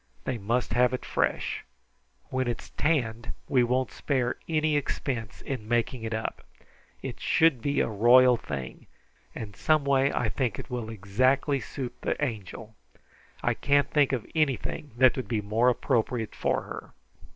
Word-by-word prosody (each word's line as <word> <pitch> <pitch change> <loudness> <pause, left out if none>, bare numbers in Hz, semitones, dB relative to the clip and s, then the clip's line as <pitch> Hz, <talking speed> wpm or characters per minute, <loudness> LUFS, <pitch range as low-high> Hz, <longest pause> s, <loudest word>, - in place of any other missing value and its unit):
They 120 - -2
must 115 +4 -1
have 125 +1 +3
it - - -8
fresh. - - -1 0.7
When 130 -1 0
it's 120 - -4
tanned 120 -7 0
we 130 -4 +3
won't 125 +1 0
spare 130 -4 -1
any 155 -1 +2
expense 125 -5 -3
in 125 -6 -5
making 120 +1 0
it 115 0 -4
up. 110 0 -3 0.6
It - - -5
should 160 -7 +3
be 140 +4 +1
a - - +1
royal 120 +4 +6
thing, 70 - -6 0.5
and 100 -3 -7
some 155 -3 +2
way 135 0 +3
I 125 - 0
think 120 -3 -1
it - - -8
will 120 -3 -3
exactly 130 +7 +1
suit 130 0 -5
the - - -1
Angel. 110 -4 -4 0.7
I - - +2
can't 145 0 +2
think 145 -3 +3
of 125 -5 -2
anything 150 -1 -1
that 130 0 +6
would 130 -5 -3
be 110 0 0
more 110 +4 +2
appropriate 120 -2 0
for - - 0
her." - - -9
125 Hz, 160 wpm, -27 LUFS, 115-135 Hz, 0.7 s, royal